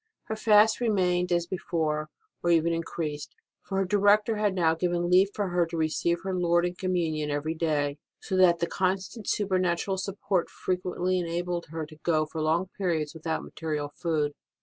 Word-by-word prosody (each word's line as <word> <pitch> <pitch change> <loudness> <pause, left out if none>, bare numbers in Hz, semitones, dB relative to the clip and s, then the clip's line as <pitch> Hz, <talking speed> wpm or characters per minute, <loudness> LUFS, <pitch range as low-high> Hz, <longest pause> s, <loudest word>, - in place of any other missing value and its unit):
Her 220 - -1
fasts 215 +1 +4
remained 180 -5 +1
as 175 -1 +2
before, 160 -4 -2 0.3
or 175 - 0
even 170 0 +3
increased; 160 -3 -4 0.3
for 195 - -4
her 195 - +2
director 205 +3 +3
had 210 -2 +1
now 165 -3 +3
given 175 +1 -1
leave 185 +2 +6
for 205 -3 -1
her 175 -1 +1
to 165 0 -5
receive 160 +2 +1
her 190 0 -2
Lord 175 -1 +2
in 175 - -2
Communion 170 -5 -1
every 145 +2 -1
day, 150 -3 -1 0.2
so 190 - -4
that 180 -2 +6
the 170 - 0
constant 190 +4 -2
super 195 -3 +1
natural 185 +2 0
support 195 -2 -1
frequently 185 0 -1
enabled 175 0 -3
her 160 0 -5
to 155 +1 -14
go 155 -2 +2
for 155 +1 -5
long 165 +4 +1
periods 160 -6 0
without 160 0 -3
material 150 -3 -4
food. 150 -2 -1
175 Hz, 175 wpm, -27 LUFS, 160-185 Hz, 0.3 s, leave